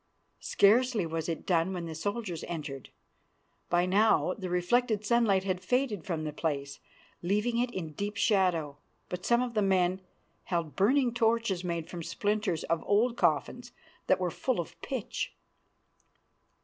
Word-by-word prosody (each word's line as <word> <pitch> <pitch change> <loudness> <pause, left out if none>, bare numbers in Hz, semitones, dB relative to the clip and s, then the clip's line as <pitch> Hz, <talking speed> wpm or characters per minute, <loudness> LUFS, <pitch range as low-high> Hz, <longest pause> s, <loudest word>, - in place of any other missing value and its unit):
Scarcely 225 0 +3
was 165 0 -3
it 165 - -4
done 175 +1 +1
when 175 -2 -4
the 165 - -5
soldiers 200 +1 -3
entered. 145 -7 -6 0.8
By 175 0 +3
now 195 -1 +3
the 185 -3 -5
reflected 210 +5 +1
sunlight 210 -4 +3
had 185 -2 -2
faded 245 -4 0
from 165 -4 -2
the 150 -1 -4
place, 140 -3 -3 0.4
leaving 210 +6 0
it 245 0 +1
in 180 -9 -5
deep 205 +5 -4
shadow; 180 -9 +2 0.3
but 180 0 -5
some 240 +1 +4
of 245 -2 -4
the 215 - +1
men 190 -1 +2 0.4
held 170 -4 -2
burning 245 +5 +3
torches 225 -5 +1
made 170 -2 -3
from 175 -1 -6
splinters 205 -1 -1
of 165 -1 0
old 230 +4 +3
coffins, - - 0 0.3
that - - +3
were - - -1
full - - -1
of - - -4
pitch. - - -4
190 Hz, 150 wpm, -30 LUFS, 170-220 Hz, 0.8 s, some